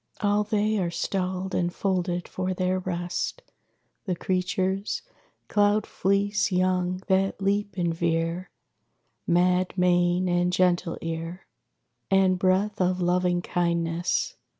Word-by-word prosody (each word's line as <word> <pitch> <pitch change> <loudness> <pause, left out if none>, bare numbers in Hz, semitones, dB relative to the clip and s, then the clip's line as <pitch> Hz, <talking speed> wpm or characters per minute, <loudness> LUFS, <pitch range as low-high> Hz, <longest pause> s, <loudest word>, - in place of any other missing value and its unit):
All 205 0 +2
they 215 0 0
are 175 -2 0
stalled 185 +2 -2
and 175 0 0
folded 180 -2 -1
for 185 0 -3
their 185 0 0
rest, 180 - -3 0.6
The 185 -3 -1
creatures: 185 +2 -1 0.4
cloud 205 +1 +2
fleece 200 +2 0
young 185 0 +1
that 195 0 +1
leap 200 0 0
and 170 -2 0
veer; 165 +2 -1 0.8
Mad 180 +2 +2
mane 180 0 +3
and 175 0 +2
gentle 180 -1 +1
ear; 165 +2 -5 0.6
And 190 -1 +3
breath 190 +2 +1
of 180 0 +1
loving 180 0 +1
kindness. 170 0 -1
185 Hz, 115 wpm, -26 LUFS, 175-195 Hz, 0.8 s, mane